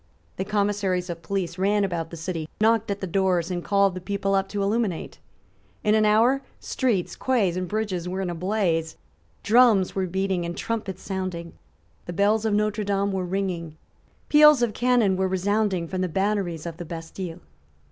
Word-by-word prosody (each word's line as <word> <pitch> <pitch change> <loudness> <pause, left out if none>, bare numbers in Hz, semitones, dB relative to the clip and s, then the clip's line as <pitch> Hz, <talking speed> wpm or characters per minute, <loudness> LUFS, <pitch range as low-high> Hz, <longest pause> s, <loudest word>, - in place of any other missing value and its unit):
The 190 - -2
commissaries 200 -3 0
of 170 -1 -7
police 185 -2 -3
ran 205 +2 +2
about 170 -4 -2
the 170 - -8
city, 165 -1 -4
knocked 225 0 +3
at 200 0 -3
the - - -2
doors, 185 -1 +1
and 175 -1 -3
called 200 -1 +3
the 185 - -6
people 195 +1 -1
up 195 0 +1
to 200 0 -2
illuminate. 205 -4 -1 0.6
In 210 - +3
an 215 0 +4
hour 230 +6 +4 0.2
streets, 225 -9 -1
quays 220 -9 +1
and 185 0 -2
bridges 190 -4 -2
were 185 +1 -3
in 185 -2 -2
a - - -3
blaze: 170 -3 -1 0.5
drums 220 -4 +4
were 190 -1 -1
beating 190 0 -1
and 170 0 -5
trumpets 205 -5 -4
sounding: 185 -3 -4 0.5
the 175 - -4
bells 210 +4 +2
of 220 - +1
Notre 210 0 0
Dame 200 0 0
were 190 -1 -2
ringing; 175 -4 -3 0.5
peals 300 -3 +7
of 230 -3 0
cannon 240 -6 +2
were 190 0 +1
resounding 190 -1 0
from 185 +2 -3
the 185 - 0
batteries 190 -3 -1
of 165 -1 -6
the 175 - -6
Bastile. 165 +1 -7
195 Hz, 180 wpm, -25 LUFS, 175-210 Hz, 0.6 s, peals